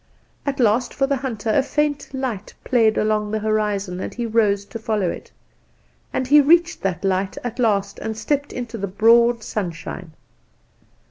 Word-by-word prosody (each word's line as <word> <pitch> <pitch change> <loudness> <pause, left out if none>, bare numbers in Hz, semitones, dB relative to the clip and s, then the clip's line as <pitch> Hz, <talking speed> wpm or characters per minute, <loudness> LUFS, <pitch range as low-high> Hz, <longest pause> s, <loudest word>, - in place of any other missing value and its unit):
"At 280 0 -1
last 240 +2 +2
for 275 - +2
the 275 0 0
hunter 235 -5 -3
a 275 - +4
faint 290 +1 -1
light 255 -7 -4
played 225 -4 +3
along 215 -1 +1
the 220 - -1
horizon, 210 -4 -1
and - - -4
he 240 - -4
rose 210 -3 +1
to 230 - -8
follow 215 -4 -1
it; - - -9 0.8
and 260 - -1
he 295 +3 +7
reached 340 +4 +3
that 195 0 -2
light 190 0 0
at 245 0 -5
last, 200 -4 +1
and 220 0 -4
stepped 285 +5 -1
into 240 -2 -6
the 200 - -2
broad 230 +4 +4
sunshine. 170 -4 -5
220 Hz, 170 wpm, -21 LUFS, 205-255 Hz, 0.8 s, he